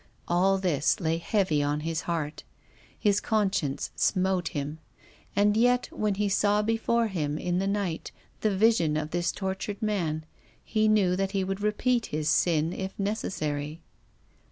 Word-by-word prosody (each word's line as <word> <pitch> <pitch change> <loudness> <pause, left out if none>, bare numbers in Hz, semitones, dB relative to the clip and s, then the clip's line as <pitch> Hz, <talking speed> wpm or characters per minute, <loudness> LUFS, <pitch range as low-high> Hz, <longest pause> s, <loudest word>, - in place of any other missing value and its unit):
All 190 +3 +3
this 175 -1 +1
lay 165 -2 0
heavy 175 -5 +1
on 145 +1 0
his 165 +1 -2
heart. 155 -3 -2 0.5
His 205 -2 +2
conscience 195 -11 0
smote 185 -2 +1
him. 145 +2 -4 0.6
And 205 +1 +3
yet, 245 +2 +3
when 210 -2 -1
he 205 +1 0
saw 205 +1 +2
before 225 +1 +1
him 155 -8 -2
in 180 +2 -1
the 195 - 0
night 200 -5 -2 0.3
the 215 - +1
vision 190 -8 +3
of 155 +1 -3
this 175 +1 0
tortured 190 +1 -4
man, 175 -8 -1 0.4
he 215 -1 +1
knew 200 -4 +3
that 195 +1 -1
he 195 -1 +1
would 195 +1 -3
repeat 230 +3 +1
his 150 0 -1
sin 165 -1 +2
if 190 0 -5
necessary. 155 -7 -2
190 Hz, 155 wpm, -28 LUFS, 160-210 Hz, 0.6 s, All